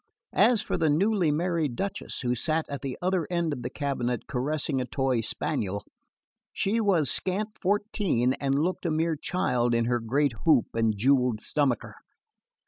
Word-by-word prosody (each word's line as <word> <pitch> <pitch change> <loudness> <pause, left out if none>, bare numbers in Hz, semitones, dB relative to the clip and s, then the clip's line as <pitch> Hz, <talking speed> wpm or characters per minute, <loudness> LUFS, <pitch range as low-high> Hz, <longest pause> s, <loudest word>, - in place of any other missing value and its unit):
As 240 -4 +4
for - - -2
the 160 - +2
newly 185 +3 +2
married 160 -3 0
Duchess, 195 +5 -4
who 125 -1 0
sat 155 +6 0
at 140 -1 -5
the 135 -2 -4
other 185 -3 +1
end 170 -3 0
of 125 - -6
the - - -4
cabinet 125 -4 -2
caressing 135 +1 -1
a - - -2
toy 130 -1 0
spaniel, 100 -2 -2 0.7
she 220 +4 0
was 175 - +3
scant 200 +4 0
fourteen 190 - +1
and 135 0 +1
looked 175 +4 -1
a - - +1
mere 160 +1 +1
child 125 -7 0
in 115 0 +2
her 120 0 +1
great 135 +4 +1
hoop 150 -7 +5
and 115 -2 +1
jewelled 125 -1 +2
stomacher. 135 -1 -1
145 Hz, 165 wpm, -27 LUFS, 125-175 Hz, 0.7 s, hoop